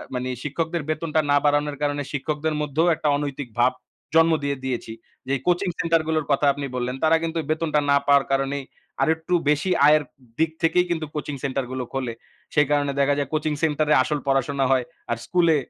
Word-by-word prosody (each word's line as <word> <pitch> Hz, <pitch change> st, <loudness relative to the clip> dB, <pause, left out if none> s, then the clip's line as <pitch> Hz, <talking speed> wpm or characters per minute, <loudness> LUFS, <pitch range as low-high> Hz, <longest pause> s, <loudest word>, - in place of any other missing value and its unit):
মানে, 125 Hz, 0 st, -2 dB
শিক্ষকদের 160 Hz, +3 st, -2 dB
বেতনটা 155 Hz, 0 st, 0 dB
না 145 Hz, -, +5 dB
বাড়ানোর 145 Hz, 0 st, +1 dB
কারণে 145 Hz, 0 st, 0 dB
শিক্ষকদের 150 Hz, +2 st, -2 dB
মধ্যেও 150 Hz, +3 st, +1 dB
একটা 150 Hz, -, -3 dB
অনৈতিক 145 Hz, -2 st, -4 dB
ভাব 125 Hz, +1 st, +5 dB, 0.4 s
জন্ম 165 Hz, 0 st, +6 dB
দিয়ে 140 Hz, -1 st, -1 dB
দিয়েছি। 125 Hz, -3 st, -3 dB, 0.3 s
যেই 135 Hz, -1 st, 0 dB
কোচিং 180 Hz, +2 st, +2 dB
সেন্টার 165 Hz, -1 st, +2 dB
গুলোর 155 Hz, -2 st, 0 dB
কথা 140 Hz, +1 st, +2 dB
আপনি 140 Hz, 0 st, -5 dB
বললেন, 125 Hz, +1 st, -2 dB
তারা 160 Hz, +1 st, +5 dB
কিন্তু 165 Hz, 0 st, -2 dB
বেতনটা 155 Hz, -1 st, +1 dB
না 140 Hz, -, +6 dB
পাওয়ার 140 Hz, -1 st, +4 dB
কারণে 135 Hz, +1 st, 0 dB, 0.4 s
আরেকটু 160 Hz, +2 st, 0 dB, 0.2 s
বেশি 150 Hz, +5 st, +1 dB, 0.2 s
আয়ের 150 Hz, 0 st, +5 dB, 0.4 s
দিক 160 Hz, 0 st, +2 dB
থেকেই 170 Hz, +2 st, +3 dB
কিন্তু 165 Hz, -2 st, -1 dB
কোচিং 150 Hz, -1 st, -3 dB
সেন্টার 135 Hz, -1 st, -1 dB
গুলো 130 Hz, -1 st, -3 dB
খোলে। 130 Hz, -3 st, -2 dB, 0.4 s
সেই 150 Hz, -2 st, +4 dB
কারণে 145 Hz, -1 st, +2 dB
দেখা 140 Hz, +1 st, +3 dB
যায় 140 Hz, -2 st, -2 dB
কোচিং 155 Hz, 0 st, 0 dB
সেন্টার 155 Hz, -1 st, +1 dB
এ -, -, +7 dB
আসল 150 Hz, +2 st, -2 dB
পড়াশোনা 135 Hz, 0 st, +1 dB
হয়, 130 Hz, -2 st, +2 dB, 0.3 s
আর 120 Hz, -, 0 dB
স্কুলে 170 Hz, -3 st, +3 dB
145 Hz, 185 wpm, -23 LUFS, 140-160 Hz, 0.4 s, এ